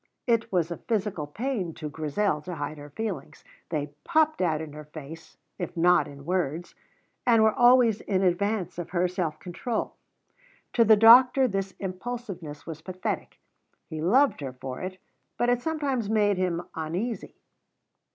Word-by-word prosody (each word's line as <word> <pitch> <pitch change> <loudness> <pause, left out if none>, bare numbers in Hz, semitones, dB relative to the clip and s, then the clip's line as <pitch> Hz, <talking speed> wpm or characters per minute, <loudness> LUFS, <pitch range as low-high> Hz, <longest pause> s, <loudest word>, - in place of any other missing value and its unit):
It 230 -1 +1
was 175 -3 +1
a 170 - -3
physical 205 -9 -2
pain 200 - -3
to 155 - -5
Grizel 150 +3 -1
to 180 +3 -6
hide 150 0 -5
her 145 0 -10
feelings; 220 +10 -5 0.3
they 145 -2 -3
popped 315 - +2
out 160 -4 +1
in 155 -2 -7
her 150 0 -9
face, 155 +1 -11 0.2
if 175 -1 -5
not 180 +1 +4
in 140 -1 -11
words, 175 -1 -2 0.5
and 230 -3 +5
were 220 -1 +4
always 240 -3 +5
in 190 -1 0
advance 185 0 0
of 175 - -5
her 180 0 +1
self 175 -4 -2
control. 205 +6 -3 0.8
To 235 - +5
the 220 -1 +6
doctor 250 +4 +8
this 195 -3 -3
impulsiveness 185 -6 -6
was 160 -2 -7
pathetic; 185 +2 -4 0.5
he 155 -1 -4
loved 250 - +3
her 135 -2 -5
for 130 0 -7
it, 185 0 -5 0.4
but 240 - +2
it 245 0 +2
sometimes 275 -8 -1
made 205 -3 +2
him 175 -2 0
uneasy. 175 +9 -4
185 Hz, 160 wpm, -27 LUFS, 160-225 Hz, 0.8 s, doctor